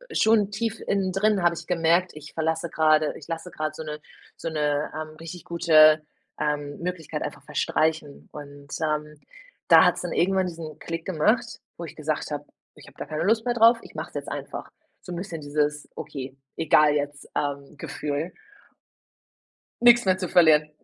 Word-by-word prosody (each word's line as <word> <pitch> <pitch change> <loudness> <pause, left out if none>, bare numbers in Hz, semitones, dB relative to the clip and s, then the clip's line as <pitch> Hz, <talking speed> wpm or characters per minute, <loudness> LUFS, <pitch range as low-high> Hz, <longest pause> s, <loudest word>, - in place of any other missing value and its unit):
schon 220 -2 +4
tief 225 +2 -3
innen 195 -2 +1
drin 195 0 +2
habe 175 0 +4
ich - - -8
gemerkt, 170 +1 +2
ich 150 -1 -11
verlasse 160 +1 -1
gerade 155 -1 +3
ich 145 - -12
lasse 165 +2 -5
gerade 155 -1 -3
so 160 - -6
'ne 150 -1 -6 0.4
so - - -4
'ne, 150 -1 -1
ähm, 155 0 -6
richtig 165 +1 -9
gute, 155 -2 +6 0.4
ähm, 145 -1 -2
Möglichkeit 175 -2 -4
einfach - - -6
verstreichen. 155 -2 -1
Und, 145 -1 -11
ähm, 150 -1 -2 0.5
da - - +8
hat's - - +2
dann - - -4
irgendwann 190 +1 +2
diesen 160 -3 -8
Klick 165 0 -5
gemacht, 215 +10 0 0.2
wo 170 - -6
ich 160 - -10
gesagt 155 0 -3
habe: 145 0 -3 0.3
„Ich - - -16
hab - - -17
da - - -5
keine 155 -1 -4
Lust 220 +4 +2
mehr 245 - +1
drauf, 230 0 +6
ich - - -14
mache - - -5
es - - -25
jetzt - - -4
einfach." - - -6 0.3
So 180 - -7
bisschen 170 -2 -6
dieses 150 0 -1
„Okay, 135 -1 -7 0.2
egal 150 -1 +4
jetzt“ 145 0 -3
ähm, 140 0 -3
Gefühl 150 +3 -4 1.5
Nix 240 -1 +7
mehr 185 -1 +3
zu 185 -1 -3
verlieren. 155 -4 +5
160 Hz, 175 wpm, -25 LUFS, 150-180 Hz, 1.5 s, da